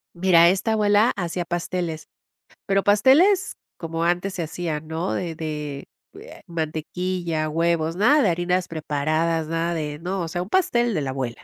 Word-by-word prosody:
Mira, 170 -1 +5
esta 195 +4 0
abuela 210 +1 +3
hacía 175 -1 -3
pasteles. 175 -2 -3 0.6
Pero 195 -1 +1
pasteles 280 - +4 0.2
como 165 0 -4
antes 175 +3 0
se 175 - -3
hacían, 160 -1 -4
¿no? 165 +3 -2
De 170 -3 -3
de 150 -3 -5 0.6
mantequilla, 165 0 -3
huevos, 165 0 0
nada 280 +10 +4
de 205 - +3
harinas 180 +2 0
preparadas, 155 +1 -1
nada 165 +1 -1
de 150 -2 -4
no, 185 +2 -3
o 165 - -3
sea 175 +2 -3
un 190 - -12
pastel 240 - +2
de 155 - -1
la 135 - -3
abuela. 130 -3 -5
170 Hz, 155 wpm, -23 LUFS, 160-190 Hz, 0.6 s, Mira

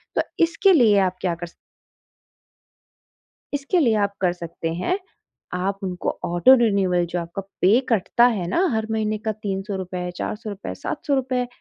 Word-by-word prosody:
तो - - +3 0.2
इसके 335 +4 +4
लिए 225 -9 +5
आप 185 0 -2
क्या 180 -2 0
कर 175 +1 -7
स - - -18 2.0
इसके 285 +5 +1
लिए 235 -8 +3
आप 200 - -6
कर 180 -2 +2
सकते 170 -1 -5
हैं, 270 - -1 0.6
आप 195 +2 -2
उनको 180 -2 -3
ऑटो 175 +9 +5
रिन्यूअल 195 -7 +2
जो 175 - -1
आपका 170 +3 -5 0.2
पे 205 +7 +5
कटता 235 +2 +3
है 175 -2 -3
ना, 345 - +2
हर 220 0 -1
महीने 215 -1 0
का 220 +1 -2
300 200 -1 -4
रुपए, 180 -1 -4
400 215 +4 -4
रुपए, 200 -1 -6
700 285 - -2
रुपए, 255 -2 -1
200 Hz, 165 wpm, -23 LUFS, 180-240 Hz, 2.0 s, लिए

